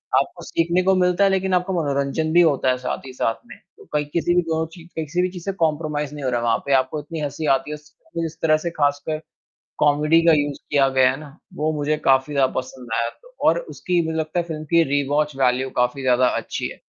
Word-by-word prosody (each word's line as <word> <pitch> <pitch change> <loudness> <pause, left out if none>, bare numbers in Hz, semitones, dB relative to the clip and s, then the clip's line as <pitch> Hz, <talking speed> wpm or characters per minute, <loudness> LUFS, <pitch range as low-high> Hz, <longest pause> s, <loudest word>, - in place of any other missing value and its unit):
आपको 140 +6 0
सीखने 170 +3 +1
को 190 +1 +4
मिलता 180 +1 +2
है 195 - +5
लेकिन 190 -1 0
आपका 180 +1 +1
मनोरंजन 145 -1 -1
भी 175 - +7
होता 145 -6 +3
है 130 - +2
साथ 125 +1 -4
ही 130 - -9
साथ 115 -3 0
में, - - -12 0.2
तो - - -16
कहीं 150 0 +1
किसी 175 +1 +1
भी 180 - +5
दोनों 160 -1 -1
ची 170 - -12
किसी 160 +3 -1
भी 185 - +1
चीज़ 180 -2 -9
से 195 - 0
कॉम्प्रोमाइज़ 150 -2 -1
नहीं 145 - -7
हो - - +1
रहा 120 - +1
है - - -4
वहाँ 115 -1 +3
पे, 140 - +1
आपको 130 +3 +1
इतनी 160 +2 -7
हँसी 150 +2 -3
आती 140 +3 -5
है - - -3
उस 150 0 -17 0.3
इस 160 0 -7
तरह 155 -1 +4
से 170 +2 -3
ख़ासकर 145 0 -1 0.6
कॉमेडी 150 +3 +4
का 165 - +7
यूज़ 145 -1 -1
किया 140 -2 +4
गया 130 -1 +4
है 130 - -5
ना, 150 0 -12 0.2
वो 155 +1 -1
मुझे 150 0 0
काफ़ी 135 +2 +3
ज़्यादा 135 -2 +2
पसंद 130 -1 -6
आया 115 +1 0 0.4
और - - +2
उसकी 180 - -2
मुझे 160 0 -2
लगता 160 +2 -1
है - - 0
फ़िल्म 155 -2 -5
की 170 0 +6
रीवॉच 145 +1 0
वैल्यू 130 0 +2
काफ़ी 125 +2 +1
ज़्यादा 125 -1 +3
अच्छी - - -3
है, - - -9
150 Hz, 240 wpm, -22 LUFS, 135-165 Hz, 0.6 s, भी